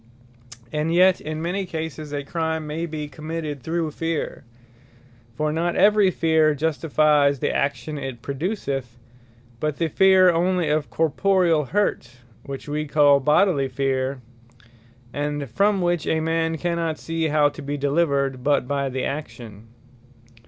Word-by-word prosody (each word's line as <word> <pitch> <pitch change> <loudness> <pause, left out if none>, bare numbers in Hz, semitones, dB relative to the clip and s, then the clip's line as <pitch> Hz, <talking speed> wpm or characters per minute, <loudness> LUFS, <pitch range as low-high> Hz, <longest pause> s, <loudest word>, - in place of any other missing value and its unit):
And 155 +2 -1
yet 185 +2 +4
in 155 +1 -5
many 185 +4 -1
cases 160 -2 -5
a 145 -1 -3
Crime 160 +1 -2
may 160 +3 -3
be 155 -2 -5
committed 155 0 -6
through 160 +2 -2
Feare. 165 0 -3 0.9
For 150 +3 -1
not 170 +2 -1
every 210 -1 +5
Fear 160 -3 +2
justifies 150 -1 +2
the - - -1
Action 145 +2 -2
it 130 -4 -7
produceth, 140 - -3 0.6
but 150 +1 -2
the 165 -1 0
fear 190 +2 +5
onely 175 -1 +1
of 150 -1 0
corporeall 165 -1 +2
hurt, 130 -11 -1 0.3
which 140 +1 -7
we 150 +1 -3
call 145 -1 +5
Bodily 150 0 +3
Fear, 130 0 -2 0.9
and 145 -1 -3
from 200 - +1
which 175 -2 0
a 160 - +1
man 165 0 0
cannot 170 -1 -2
see 165 -1 -2
how 150 -1 +3
to 145 - -10
be 145 +1 -4
delivered, 140 -3 0
but 145 -3 +1
by 140 0 -1
the 130 0 -3
action. 120 -7 -6
155 Hz, 140 wpm, -23 LUFS, 140-165 Hz, 0.9 s, every